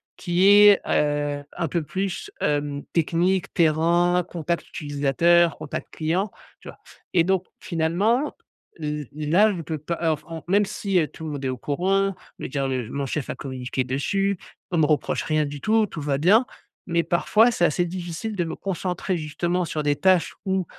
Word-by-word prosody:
qui 175 +2 +2
est, 205 0 +8
heu, 145 -1 0
un 165 - -1
peu 170 +3 -1
plus, 190 +4 -4
hem, 145 -1 -1
technique, 175 +3 +1
terrain, 170 +2 +3
contact 170 0 -3
utilisateur, 155 +4 +2
contact 150 -2 -6
client, 175 +6 -1 0.3
tu - - -10
vois? - - -12 0.4
Et 170 -2 +4
donc 190 0 +1 0.2
finalement, 195 - 0 0.4
l 150 -2 -3
là, 170 +8 +3
je 170 - -5
peux 160 0 -4
pas, 160 +3 -4
heu, 165 - +1
enf 155 -2 -1
en 165 -1 -8
même 205 +3 +3
si, 195 -1 -1
heu, 155 - +1
tout 160 - -10
le 155 - -4
monde 140 -1 -5
est - - 0
au 130 - -3
courant, 195 +7 0 0.2
je - - -8
veux - - -5
dire 135 0 -1
le 130 -4 -2
mon 140 +1 -3
chef 135 +1 -3
a - - -3
communiqué 130 -1 -3
dessus, 195 +10 0 0.3
on 175 - 0
me 155 - +5
reproche 150 -1 0
rien 155 -1 +1
du 145 -1 -7
tout, 220 0 +3
tout 170 -6 -7
va 145 -1 0
bien. 200 - +5 0.4
Mais 170 -1 +1
parfois 215 +8 +3
c'est 175 -6 +2
assez 170 +2 +1
difficile 175 +4 -5
de 180 - 0
me 165 - -5
concentrer 185 -1 -3
justement 175 +3 -1
sur 155 -1 -3
des 145 0 +2
tâches 185 -1 +3
où, 190 -1 0
170 Hz, 190 wpm, -24 LUFS, 150-185 Hz, 0.4 s, est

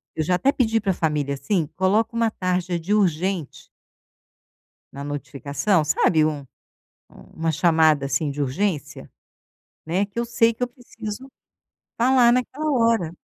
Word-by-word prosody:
eu 160 - -1
já 180 +3 +1
até 270 +10 +2
pedi 225 -4 +1
para 195 -3 0
família 150 -4 -1
assim: 160 +3 -1
"Coloca 215 +5 +1
um - - 0 0.2
tarja 180 -1 -1
de 190 +6 -2
urgente" 185 -4 -1 1.3
"na 140 +1 -7
notificação", 145 +4 -1
sabe, 155 +1 +2
um 145 -3 -3 0.9
uma 165 0 -1
chamada, 160 -3 +3
assim, 140 +2 -1
de 145 +1 -4
urgência, 145 -1 -3 0.8
né, 185 +5 +1
que 200 +4 -5
eu 235 - -2
sei 230 0 +3
que 235 - -10
eu 245 - +1
preciso 245 0 -9 0.7
falar 245 0 +4
naquela 270 +5 -1
hora. 230 -9 +2
180 Hz, 140 wpm, -23 LUFS, 150-225 Hz, 1.3 s, falar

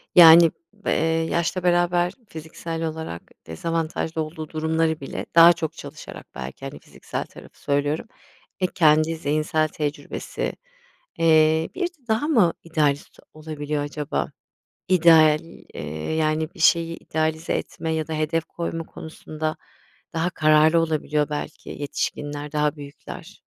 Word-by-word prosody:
Yani, 165 -1 +9 0.2
b 205 - -27
ııı, 160 +1 +1
yaşla 170 +2 -1
beraber 175 0 +2
fiziksel 165 0 -6
olarak 160 - -7 0.2
dezavantajlı 160 - -2
olduğu 155 0 -6
durumları 160 0 0
bile 135 - -6
daha 170 +1 +9
çok 160 -2 -4
çalışarak - - -10
belki, 65 0 -7
hani, - - -7
fiziksel - - -6
tarafı - - -15
söylüyorum, 145 +6 0 0.5
e, 185 - +2
kendi 155 -2 +3
zihinsel 155 0 0
tecrübesi, 145 -2 -4 0.7
eee, 160 0 +4
bir 360 -1 0
de 295 -9 -20
daha 220 +7 +1
mı 220 - +4
idealist 150 -3 -1
olabiliyor 150 -1 -4
acaba? 145 0 -3 0.6
İdeal, 160 -4 +6 0.4
ııı, - - -5 0.3
yani, 155 0 0
bir - - -14
şeyi 165 +1 +3
idealize 160 +1 -2
etme 160 0 -3
ya 160 -1 -2
da 160 - -4
hedef 155 +1 -1
koyma 165 -1 -4
konusunda 155 0 -6 0.6
daha 165 +1 0
kararlı 155 0 +4
olabiliyor 150 -2 0
belki 150 0 -6
yetişkinler 145 0 -4
daha 150 0 +1
büyükler. 145 -1 -10
160 Hz, 125 wpm, -23 LUFS, 150-165 Hz, 0.7 s, Yani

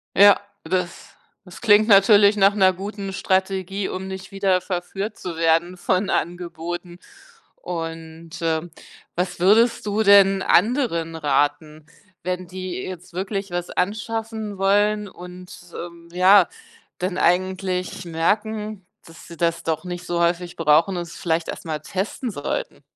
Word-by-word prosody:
Ja, 200 +1 +7 0.2
das 175 +1 -3 0.3
das 180 - -13
klingt 215 -1 +5
natürlich 205 0 +6
nach 200 0 +4
'ner 190 -2 +4
guten 195 +1 -6
Strategie, 190 +1 -1
um 185 +1 -5
nicht 190 0 -8
wieder 195 -2 +1
verführt 195 +3 -4
zu 170 -3 -6
werden 165 +2 +2
von 185 +2 0
Angeboten. 175 +1 -4 0.6
Und, 165 - -7
ähm, 165 +1 -1 0.4
was 180 0 -2
würdest 220 +6 +4
du 210 +1 0
denn 195 -1 +6
anderen 180 - +1
raten, 150 +1 -1 0.4
wenn 180 0 -3
die 185 0 -6
jetzt 180 -1 -8
wirklich 195 +1 -4
was 175 0 -3
anschaffen 220 +1 -3
wollen 205 +2 +2
und 180 -1 -11
s 175 -1 -14
ähm, 170 -1 -9
ja, 185 +1 +6 0.5
dann 180 0 -3
eigentlich 185 +1 0
merken, 210 +4 -2 0.2
dass 165 0 -14
sie 170 -1 -11
das 170 0 0
doch 160 +1 -2
nicht 175 0 -6
so 175 -1 -2
häufig 175 +1 0
brauchen 165 +4 +3
und 175 - -2
es 170 - -11
vielleicht 165 -1 -1
erst - - -7
mal 155 -2 -3
testen 195 - -4
sollten. 145 -7 -4
185 Hz, 140 wpm, -22 LUFS, 170-200 Hz, 0.6 s, Ja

